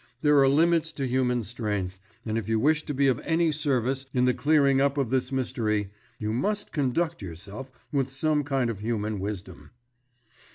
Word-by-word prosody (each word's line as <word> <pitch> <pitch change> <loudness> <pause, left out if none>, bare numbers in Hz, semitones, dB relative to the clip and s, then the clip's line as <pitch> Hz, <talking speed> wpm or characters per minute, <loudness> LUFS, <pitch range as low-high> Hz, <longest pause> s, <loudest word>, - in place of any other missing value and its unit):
There 150 -2 +5
are 135 -1 +5
limits 165 +2 +3
to 140 - -3
human 125 -1 +1
strength, 100 -4 -3 0.3
and 110 -1 -2
if 115 -2 -2
you 110 -1 +2
wish 150 +5 +3
to 145 - -2
be 140 +1 +2
of 130 -4 +2
any 165 0 +2
service 135 -3 -1
in 125 0 +3
the 125 - +3
clearing 140 -2 +3
up 140 +1 +2
of 135 -4 0
this 130 0 0
mystery, 110 -6 -1 0.3
you 105 0 -2
must 205 - -1
conduct 160 +3 -1
yourself 100 +8 -8 0.2
with 135 -2 0
some 150 +2 +1
kind 135 -4 0
of 105 - -7
human 110 -1 -2
wisdom." 100 -1 -6
130 Hz, 180 wpm, -27 LUFS, 110-145 Hz, 0.3 s, There